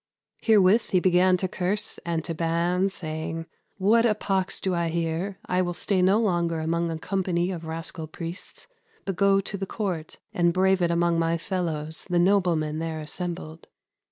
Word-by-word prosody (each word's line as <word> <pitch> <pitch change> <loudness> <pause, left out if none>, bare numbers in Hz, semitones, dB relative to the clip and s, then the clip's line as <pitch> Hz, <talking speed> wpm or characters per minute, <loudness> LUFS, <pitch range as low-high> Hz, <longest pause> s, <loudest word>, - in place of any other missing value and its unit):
Heerewith 215 0 +4
he 185 - +3
began 180 0 +4
to 185 - -1
curse 190 +3 -2
and 165 -2 -2
to 165 - -3
banne, 170 +3 +1
saying, 160 -2 -5 0.3
'What 215 +4 +4
a 225 -3 +3
poxe 190 -3 -1
do 190 - -1
I 170 -1 0
heare? 170 +4 -2
I 180 0 +1
will 175 -1 -2
stay 190 0 +1
no 190 +4 +4
longer 170 -6 +1
among 170 +1 0
a 165 - -3
company 180 0 -1
of 170 -3 -6
rascal 160 0 -5
priests, 165 +3 -8 0.4
but 195 - -2
goe 195 +1 +4
to 200 +1 -4
the 195 0 -4
court 180 -8 -4 0.2
and 170 -1 +2
brave 190 +1 +3
it 175 - +2
amongst 170 0 +2
my 165 0 +1
fellowes, 165 -3 -3
the 175 - +1
noblemen 175 -5 +2
there 160 -1 -3
assembled.' 160 0 -6
175 Hz, 175 wpm, -26 LUFS, 165-190 Hz, 0.4 s, Heerewith